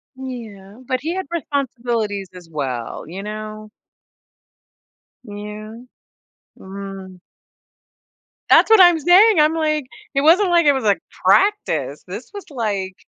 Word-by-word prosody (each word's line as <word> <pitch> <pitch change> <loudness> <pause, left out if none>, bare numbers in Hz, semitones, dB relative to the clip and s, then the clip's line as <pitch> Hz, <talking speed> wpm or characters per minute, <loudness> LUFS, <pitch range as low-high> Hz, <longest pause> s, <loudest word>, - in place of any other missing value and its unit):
Yeah, 225 -6 -9
but 255 0 -1
he 330 +4 -3
had 380 - -3
responsibilities 240 - -3
as 175 -2 -13
well, 130 -6 -5
you 190 +4 -7
know? 215 0 -7 1.5
Yeah. 210 0 -8 0.8
Mm. 190 -1 -9 1.3
That's - - +6
what 440 -4 +7
I'm 350 -3 +6
saying, 370 +5 +5
I'm 305 +1 +4
like, 305 -3 -1 0.3
it 275 - +1
wasn't 355 +5 +4
like 340 -2 +3
it 290 - +6
was, 265 - -2
like, 205 -2 +2 0.3
practice, 415 +1 +2
this - - -8
was, 405 - -7
like 200 -7 -3
235 Hz, 125 wpm, -20 LUFS, 200-315 Hz, 1.5 s, what